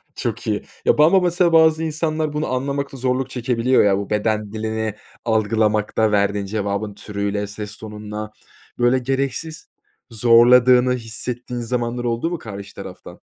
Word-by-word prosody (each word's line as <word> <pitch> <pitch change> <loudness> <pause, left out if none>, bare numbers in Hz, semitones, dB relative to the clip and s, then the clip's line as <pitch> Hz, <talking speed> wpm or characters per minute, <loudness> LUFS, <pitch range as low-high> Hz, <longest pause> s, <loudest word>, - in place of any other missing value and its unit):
Çok - - -4
iyi. - - -1 0.2
Ya, - - +4
bu 150 - +6
ama 190 +4 +5
mesela 175 -1 +2
bazı 160 0 +5
insanlar 155 -1 -1
bunu 150 +1 -1
anlamakta 140 +1 -2
zorluk 130 +1 -1
çekebiliyor 125 0 +2
ya, 100 -1 +3
bu 100 - -5
beden 105 0 -1
dilini 110 -1 -3 0.3
algılamakta, 110 -1 +1
verdiğin 100 0 +1
cevabın 100 0 -3
türüyle, 100 0 -3
ses 105 0 -7
tonunla, 105 0 -7 0.5
böyle, 120 +2 +3
gereksiz 135 +5 -3 0.4
zorladığını 125 +2 +5
hissettiğin 120 +1 -5
zamanlar 120 0 -2
oldu 120 +7 -1
mu 175 - -3
karşı 100 -5 -9
taraftan? - - -10
120 Hz, 140 wpm, -21 LUFS, 105-135 Hz, 0.5 s, bu